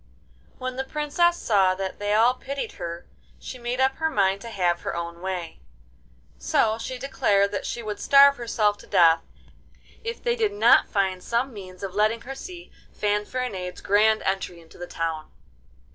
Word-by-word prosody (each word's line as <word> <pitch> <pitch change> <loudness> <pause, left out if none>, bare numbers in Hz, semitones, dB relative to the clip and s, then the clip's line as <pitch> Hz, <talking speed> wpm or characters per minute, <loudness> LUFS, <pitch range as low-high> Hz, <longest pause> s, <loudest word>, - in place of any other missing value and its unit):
When 255 0 -5
the 265 - -1
Princess 300 +5 +1
saw 190 -4 +2
that 190 0 -5
they 205 0 -2
all 230 +3 +5
pitied 275 +2 -5
her 170 -1 -7 0.3
she 255 - -9
made 240 +1 -3
up 265 0 +2
her 320 0 0
mind 195 -6 +1
to 230 - -8
have 175 -5 0
her - - -4
own 170 0 -5
way. 180 -3 -5 0.8
So 220 - +1
she 255 +2 -5
declared 205 -7 +1
that 200 - -3
she 235 - -4
would 210 -1 -5
starve 280 0 +6
herself 215 -3 0
to - - -15
death 165 -1 +5 0.8
if 460 +1 -5
they 475 -1 +1
did 435 -4 0
not 410 - +5
find 190 -3 0
some 235 +6 -1
means 185 -2 -10
of 190 -2 -4
letting 215 +3 +1
her 265 +3 -7
see 350 +5 -10 0.2
Fanfaronade's 210 -2 -3
grand 215 +2 +3
entry 190 -2 -2
into 165 0 -17
the 175 - -6
town. 165 -2 -4
210 Hz, 175 wpm, -25 LUFS, 185-255 Hz, 0.8 s, starve